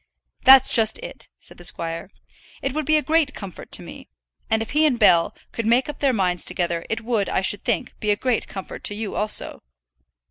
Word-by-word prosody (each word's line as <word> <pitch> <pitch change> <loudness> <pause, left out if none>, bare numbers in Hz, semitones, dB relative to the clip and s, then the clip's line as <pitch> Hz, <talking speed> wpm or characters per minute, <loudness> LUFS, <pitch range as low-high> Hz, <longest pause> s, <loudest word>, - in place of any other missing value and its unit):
"That's 265 -1 +8
just 220 -2 +5
it," - - -9
said - - -11
the - - -11
squire. 170 +1 -2 0.5
"It 270 - -2
would 305 -1 -3
be 310 0 +4
a 300 - -1
great 315 -2 +1
comfort 195 -4 -9
to - - 0
me. - - -12 0.4
And 220 0 +1
if 225 - -10
he 305 +2 +2
and 255 -5 0
Bell 175 -7 +4 0.2
could 230 -1 -4
make 240 +3 +3
up 295 - -7
their 275 -2 +2
minds 180 -6 -1
together, 170 -2 -2
it 225 0 -2
would, 225 -3 -1
I - - 0
should 195 +1 0
think, 235 -4 -2
be 210 - -2
a 205 - +4
great 245 +2 -1
comfort 190 -2 -8
to 205 - 0
you 215 -1 -4
also." 210 0 0
220 Hz, 215 wpm, -22 LUFS, 195-265 Hz, 0.5 s, That's